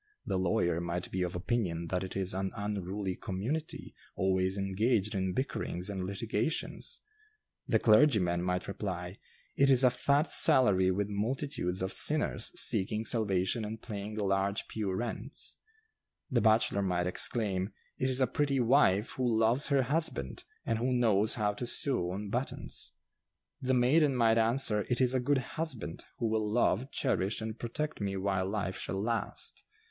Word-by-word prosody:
The 95 - -1
lawyer 85 -2 +1
might 85 +1 -3
be 95 - -2
of 90 -1 -2
opinion 90 -4 -1
that 90 +1 -1
'it 95 - -6
is 95 -1 -1
an 95 0 -1
unruly 100 -2 -3
community, 125 +13 -4 0.2
always 95 0 +1
engaged 105 +2 +1
in 95 -2 -1
bickerings 100 -7 -3
and 95 -2 -3
litigations.' 110 +8 -2 0.7
The - - +3
clergyman 105 -8 +4
might 90 0 -1
reply, 90 -2 -5 0.4
'It 140 0 +4
is 130 -1 +6
a 125 - +6
fat 140 +5 +1
salary 105 - +5
with 100 +2 0
multitudes 105 -3 -2
of 95 - -2
sinners - - +1
seeking 105 +3 +1
salvation 105 -1 0
and 110 +1 -5
paying 105 -2 -6
large 100 0 0
pew 105 -3 -2
rents.' 115 +5 -4 0.7
The 120 -2 +3
bachelor 110 -2 +3
might 90 -2 0
exclaim, 95 +1 0 0.3
'It 130 - +1
is 130 0 0
a 130 - +4
pretty 140 0 0
wife 115 -5 +3
who 120 -3 0
loves 115 +5 +3
her 140 -2 +3
husband, 130 - -1 0.2
and 115 -1 0
who 125 +2 0
knows 110 -4 +3
how 105 -2 0
to 120 +4 -5
sew 120 -8 0
on 100 +3 -4
buttons.' 125 +4 -4 0.7
The 130 0 +1
maiden 135 +3 +4
might 115 -2 +4
answer, 115 -2 +2
'It 125 - +1
is 130 -1 +3
a 130 - +2
good 140 +3 +2 0.2
husband, 125 - -4
who 120 - -2
will 110 -1 0
love, 120 +2 +2
cherish 105 -8 0
and 110 0 -5
protect 150 +3 -3
me 100 -1 -2
while 95 -1 0
life 95 -2 -2
shall 95 +3 -3
last. 115 +3 -3
105 Hz, 160 wpm, -31 LUFS, 95-125 Hz, 0.7 s, is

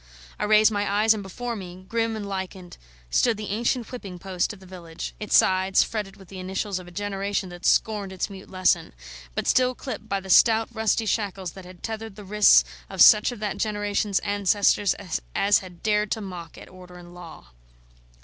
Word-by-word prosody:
I - - 0
raised 215 +1 +5
my 205 -1 -1
eyes, 215 +2 +4
and 215 - -5
before 235 +5 -5
me, 185 -2 -9
grim 230 0 -1
and 210 -2 -5
lichened, 190 -2 -6 0.3
stood 235 -3 +2
the 210 -1 -6
ancient 235 +2 -1
whipping 200 -8 -7
post 185 +2 -2
of 210 - -11
the 190 - -15
village; 175 -3 -8
its 210 - +3
sides 190 0 +3
fretted 210 -3 -5
with 195 - -15
the 190 0 -9
initials 190 +1 -3
of 180 - -12
a - - -12
generation 200 0 -3
that 175 0 -4
scorned 210 -3 +1
its 190 - -3
mute 195 -2 -11
lesson, 185 - +1 0.4
but - - -2
still 255 0 +3
clipped 220 -5 -7
by 195 - 0
the 190 0 -5
stout 225 +1 +5
rusty 220 0 0
shackles 195 -4 -2
that 190 +1 -12
had 180 0 -14
tethered 220 -2 -5
the 210 -1 -11
wrists 205 - +6 0.3
of - - -8
such 210 +3 +7
of 240 - -8
that 210 -2 -2
generation's 205 -2 -1
ancestors 205 -1 +2 0.4
as 200 +1 +4
had 180 -2 -13
dared 210 -1 +1
to 225 - -1
mock 180 -5 -8
at - - -11
order 180 -1 -14
and 175 0 -13
law. 165 - -12
200 Hz, 195 wpm, -25 LUFS, 185-215 Hz, 0.4 s, such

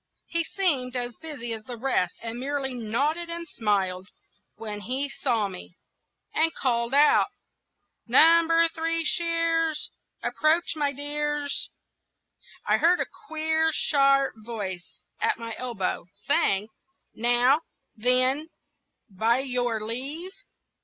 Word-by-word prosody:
He 335 0 -1
seemed 290 -10 -1
as 245 -1 -3
busy 270 -8 -5
as 220 -1 -6
the 245 -2 -7
rest, 220 -8 0
and 230 +1 -5
merely 270 0 -2
nodded 280 +9 -1
and 335 0 -5
smiled 190 - -1 0.5
when 210 -2 -6
he 260 +7 -1
saw 230 -7 0
me, 180 -2 -10 0.6
and 325 +1 +3
called 235 0 0
out,— 295 +1 +5 0.8
"Number 330 0 +6
Three 330 0 -1
Shears, 330 -2 +1 0.3
Approach, 320 +2 +2
my 290 -2 0
dears!" 290 0 -2 1.0
I - - +3
heard 350 +2 +3
a - - +1 0.2
queer, 320 0 +1
sharp 275 -2 +3
voice 200 -6 -6 0.2
at - - +1
my 230 0 -6
elbow, 220 -8 -3
saying, 200 0 +1 0.4
"Now, 245 +5 +3 0.3
then, 255 +6 +3 0.6
by 225 +4 +1
your 245 -4 -1
leave!" 280 +11 -5
270 Hz, 115 wpm, -26 LUFS, 230-320 Hz, 1.0 s, Number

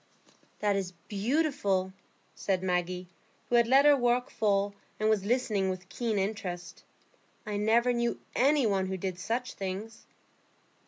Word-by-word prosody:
"That 205 -1 +2
is 190 -2 -2
beautiful," 205 -5 0 0.4
said 190 -2 -1
Maggie, 180 0 -1 0.4
who 240 - +2
had 235 -1 +5
let 270 +3 +6
her 295 -1 +8
work 245 -1 +1
fall, 200 -1 +1 0.3
and 215 +1 +3
was 205 -3 +1
listening 215 -5 +1
with 185 0 -5
keen 230 -3 -2
interest. 190 -3 -4 0.6
"I 210 -2 -3
never 230 +4 +3
knew 235 0 -1 0.2
any 280 0 +4
one 195 -3 +1
who 190 0 -3
did 185 -1 -4
such 240 +6 -2
things." 195 +3 -6
205 Hz, 145 wpm, -29 LUFS, 190-240 Hz, 0.6 s, her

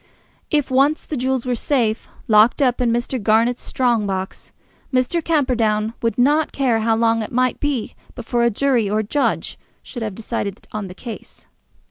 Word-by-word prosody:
If 295 -3 0
once 275 +4 +2
the 305 - -4
jewels 260 -1 -1
were 250 - 0
safe, 235 -3 0 0.2
locked 215 +2 +5
up 255 -3 +2
in 245 - +2
Mr. 240 +1 -2
Garnett's 225 +4 +2
strong 235 -5 0
box, 190 -1 -5 0.4
Mr. 260 +6 +1
Camperdown 230 -9 +1
would 230 -3 -1
not 290 +5 +3
care 250 -5 +1
how 225 0 +2
long 225 0 +2
it 215 - -5
might 255 +1 +1
be 285 -6 -2 0.2
before 240 -1 -1
a 235 - +4
jury 235 -2 +1
or 210 - 0
a - - -4
judge 280 +7 -1 0.2
should 240 - -8
have 215 -3 -4
decided 210 -2 -5
on 210 -2 -4
the 180 - -10
case. 230 +1 -10
240 Hz, 175 wpm, -20 LUFS, 220-260 Hz, 0.4 s, locked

